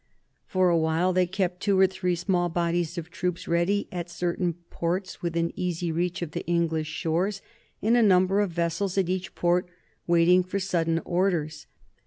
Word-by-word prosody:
For 185 -1 +2
awhile 165 +2 +2
they 180 0 +2
kept 185 -1 -2
two 200 -2 +2
or 190 - +7
three 180 -1 -1
small 175 0 0
bodies 170 0 -1
of 170 +1 -6
troops 180 -2 -3
ready 170 +4 +1
at 175 -1 -5
certain 175 0 -1 0.2
ports 180 +3 -3
within 170 -1 -1
easy 175 -2 -2
reach 175 +2 -1
of 160 - -5
the - - -4
English 165 -2 0
shores, 175 +5 -1 0.4
and 225 +3 +4
a 240 - +5
number 190 -1 +4
of 205 -2 +1
vessels 170 +3 -1
at 190 -3 +2
each 185 0 -3
port 175 +1 +1 0.4
waiting 175 +1 +5
for 185 +2 -4
sudden 165 -4 0
orders. 170 -4 -1
175 Hz, 170 wpm, -26 LUFS, 170-185 Hz, 0.4 s, or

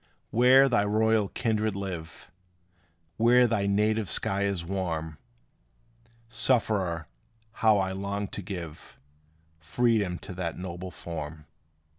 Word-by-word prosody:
Where 130 +3 +6
thy 120 -5 +2
royal 110 0 +2
kindred 110 -2 -1
live 90 -4 -7 0.9
Where 120 +2 +5
thy 105 -4 0
native 105 0 +1
sky 100 +5 0
is 95 -4 -2
warm, 80 -5 -3 1.1
Sufferer, 105 - 0 0.4
how 110 -2 +3
I 95 -1 0
long 100 +1 -3
to - - -5
give 85 -5 -8 0.6
Freedom 100 +1 +1
to 90 - -9
that 90 -2 -4
noble 90 0 -6
form! 80 -3 -7
100 Hz, 110 wpm, -27 LUFS, 90-110 Hz, 1.1 s, Where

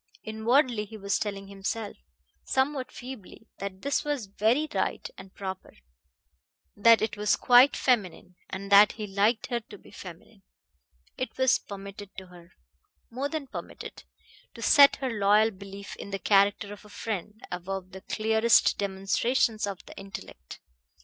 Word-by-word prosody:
Inwardly 225 +1 +1
he 220 +1 -10
was 200 -1 -1
telling 200 -2 -4
himself, 200 +2 -4 0.5
somewhat 265 0 -1
feebly, 245 -4 -10
that 195 -1 -6
this 280 0 0
was 290 -6 -2
very 220 +9 +1
right - - -1
and 190 - -12
proper; 190 -1 -7 1.0
that 225 +2 +5
it 220 - -2
was 210 0 +2
quite 250 +3 +6
feminine, 195 -7 0
and 195 +1 -6
that 200 +1 +8
he 215 - -6
liked 205 +4 +1
her 240 - +1
to 220 - -13
be - - -18
feminine. - - -12 0.8
It 255 - -4
was 260 -1 +4
permitted 200 0 -9
to 190 - -7
her 175 -1 -16 0.6
more 265 +4 -3
than 315 -2 -4
permitted 270 - -9 0.5
to - - -8
set 280 -2 +7
her 265 -2 -3
loyal 210 +1 +3
belief 200 0 -10
in - - -8
the 195 - -3
character 200 +2 +2
of 205 - -13
a 210 - -16
friend 210 0 -5
above 185 +1 -5
the 190 - -10
clearest 220 +2 +3
demonstrations 205 +3 0
of 195 -2 -6
the - - -12
intellect. 95 - -10
210 Hz, 150 wpm, -27 LUFS, 195-235 Hz, 1.0 s, that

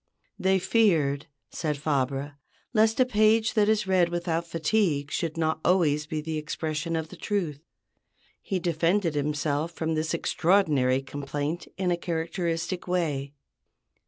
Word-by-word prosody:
They 190 0 +3
feared, 165 -9 +2 0.2
said 150 -3 -2
Fabre, 140 -1 -1 0.4
"lest 220 +1 +3
a 255 - +6
page 220 -1 +3
that 210 -1 +3
is 215 -2 +2
read 185 -2 +3
without 170 -1 -2
fatigue 165 -3 0
should 165 -2 -2
not 160 -1 0
always 150 -5 +2
be 155 0 -3
the 155 0 -3
expression 155 +1 -3
of 160 -1 -3
the - - -10
truth." 175 -9 -2 0.8
He 195 - -2
defended 170 +1 +1
himself 150 +2 -1
from 160 0 -2
this 160 +1 -1
extraordinary 150 -8 +2
complaint 145 +4 -4
in 185 -2 0
a 175 - +1
characteristic 170 +1 -2
way. 150 -6 -1
165 Hz, 135 wpm, -27 LUFS, 150-185 Hz, 0.8 s, a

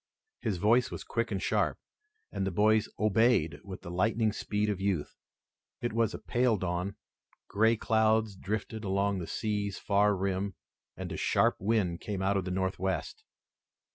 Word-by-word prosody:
His 110 -6 -1
voice 115 +7 +3
was - - -6
quick - - -2
and - - -1
sharp, - - +1 0.5
and 95 - -2
the 95 - 0
boys 105 +3 +3
obeyed 110 -5 +3
with 95 -2 -8
the 85 - -7
lightning 110 +4 +1
speed 105 -1 -1
of 100 -2 -2
youth. 95 -7 -1 0.6
It 120 -2 -2
was 115 -1 +1
a - - -4
pale 120 -2 +1
dawn. 90 +2 -2 0.5
Gray 110 +2 +3
clouds 110 -1 +2
drifted 110 +3 -4
along 100 0 0
the 85 - -5
sea's 105 -2 -2
far 105 0 +2
rim, 95 +1 -2 0.4
and - - -5
a - - -4
sharp - - +2
wind 95 -5 0
came 100 -3 -3
out 100 +1 +2
of 95 -2 0
the - - -3
Northwest. 95 - -2
100 Hz, 165 wpm, -30 LUFS, 95-110 Hz, 0.6 s, voice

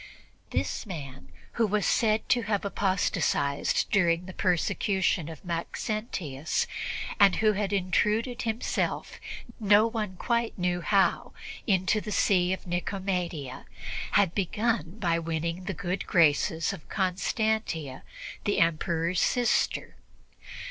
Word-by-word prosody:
This 95 - -2
man, 140 - -7 0.3
who 225 - +4
was 205 -1 0
said 220 -1 +2
to 245 - +4
have 205 -2 -1
apostatized 180 -8 +1
during 175 -3 +3
the 185 - -8
persecution 180 -1 +1
of 160 +2 -10
Maxentius 170 - -2 0.5
and 200 -2 +6
who 215 -1 +3
had 200 -1 -1
intruded 210 +5 +1
himself, 225 0 -2 0.4
no 210 0 +5
one 220 -4 -3
quite 235 +4 -1
knew 180 -1 0
how, 195 +2 +2 0.3
into 195 +1 +2
the 210 - -6
See 185 -3 +3
of 190 - -3
Nicomedia, 175 -6 -3 0.5
had 195 -4 +4
begun 205 -1 -1
by 170 -5 +1
winning 165 +2 -3
the 195 -1 -3
good 180 +4 -3
graces 160 0 +3
of 155 - -11
Constantia, 190 - -1 0.4
the 205 - +1
Emperor's 165 +1 +1
sister. 245 -2 +1
185 Hz, 115 wpm, -28 LUFS, 170-210 Hz, 0.5 s, and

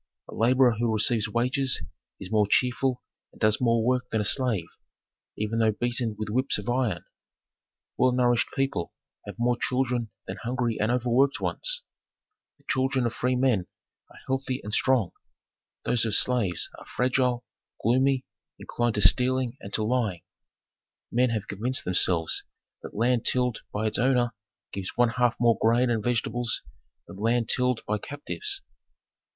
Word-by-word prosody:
A - - -10
laborer 125 +2 +4
who 120 -1 +1
receives 110 0 +1
wages 125 +4 0 0.4
is 95 - -8
more 105 -2 +3
cheerful 125 +1 +1 0.3
and - - -20
does 110 +1 +2
more 115 -2 +2
work 125 0 +1
than 110 - 0
a 105 - -1
slave, 115 -7 +1 0.7
even 110 +2 -1
though 110 -1 +3
beaten 120 0 -2
with 110 - -4
whips 130 +6 +1
of 105 - -7
iron. 120 -7 0 1.0
Well 130 - +4
nourished 120 -1 +2
people 135 -11 -1 0.3
have - - -7
more 120 +1 +2
children 125 -2 -1 0.2
than 95 - -6
hungry 120 -1 -2
and 110 +2 +1
overworked 125 +3 +2
ones; - - -2 0.7
the - - -29
children 130 -1 +1
of 115 - -1
free 125 +2 0
men 125 -8 +1 0.4
are - - -17
healthy 130 -1 -2
and 105 - -5
strong; 125 -8 +2 0.7
those 120 - +2
of 110 -2 +1
slaves 110 -9 +1
are - - -13
fragile, 125 -1 +1 0.4
gloomy, 130 +3 +2 0.3
inclined 120 -2 -2
to 105 - +1
stealing 125 +3 +1
and 100 - -8
to 110 - 0
lying. 110 -7 -1 0.9
Men 125 +1 +3
have 110 -3 -2
convinced 120 +6 -2
themselves 90 -2 +2 0.4
that - - -10
land 120 +2 +2
tilled 125 -2 +1
by 105 +1 -2
its 110 - 0
owner 125 -2 +2 0.4
gives 95 -1 -5
one 120 -1 +4
half 120 0 +1
more 120 -1 +3
grain 120 +2 +3
and 110 -3 0
vegetables 120 0 -1 0.4
than 95 - -11
land 115 +2 +1
tilled 125 -2 +2
by 105 0 0
captives. 390 - -4
120 Hz, 155 wpm, -26 LUFS, 110-125 Hz, 1.0 s, laborer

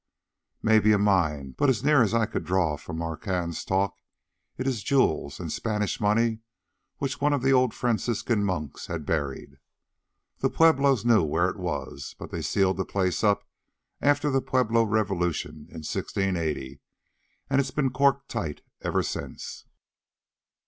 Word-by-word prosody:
"Maybe 110 -1 +5
a - - +4
mine, 80 -10 +1
but 145 - +4
as 120 -6 +1
near 150 -2 +5
as 110 - +3
I 115 -1 +2
could - - -4
draw 85 -2 +1
from 80 +3 -8
Marquand's 85 +1 -3
talk 95 +1 0 0.6
it 130 - -3
is 130 -5 -1
jewels 130 - +1
and - - -5
Spanish 105 -2 -1
money 110 +2 +2 0.6
which 135 0 -3
one 145 +1 +3
of 140 -3 0
the 135 0 +4
old 130 -2 +4
Franciscan 115 -2 0
monks 90 -7 -3
had 85 -4 -4
buried. 70 -4 -3 0.8
The - - +1
Pueblos 140 -7 +4
knew 115 -4 +5
where 80 +3 +1
it - - -11
was, 70 -6 -5
but - - -9
they - - -3
sealed 95 -1 +1
the 95 - 0
place 95 0 -1
up 105 -1 +2 0.5
after 145 0 +2
the 135 0 +2
Pueblo 120 -3 +2
revolution 95 -8 -1
in 80 -2 -9
1680, 80 -10 -2 0.7
and 140 0 +3
it's 135 - -3
been 135 -1 0
corked 140 +1 +2
tight 85 -11 -4 0.2
ever - - 0
since." - - -6
105 Hz, 155 wpm, -26 LUFS, 85-125 Hz, 0.8 s, Maybe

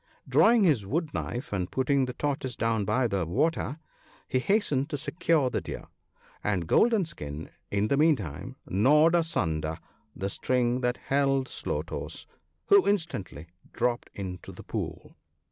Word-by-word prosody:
Drawing 230 -1 +5
his 145 - +3
wood 155 - -2
knife, 120 -1 -4
and 90 -2 -1
putting 135 +1 +2
the 125 - -5
Tortoise 135 -2 -2
down 115 -3 0
by 130 +4 +2
the 100 -4 0
water, 140 - 0 0.5
he 130 - +1
hastened 150 - +1
to 145 - -2
secure 150 -2 +1
the - - -1
Deer, - - -7 0.6
and 95 -5 0
Golden 220 - +4
skin, 75 - -7 0.2
in 100 +1 +1
the 140 - +1
meantime, 130 - +1
gnawed 150 - +4
asunder 80 - 0 0.4
the 100 +1 -3
string 125 +1 +1
that 125 0 0
held 135 -1 +1
Slow - - -3
toes, - - -6 0.4
who 400 -1 +5
instantly 160 - -1 0.3
dropped 120 0 0
into 90 -3 -6
the - - -11
pool. - - -5
130 Hz, 145 wpm, -28 LUFS, 100-155 Hz, 0.6 s, Drawing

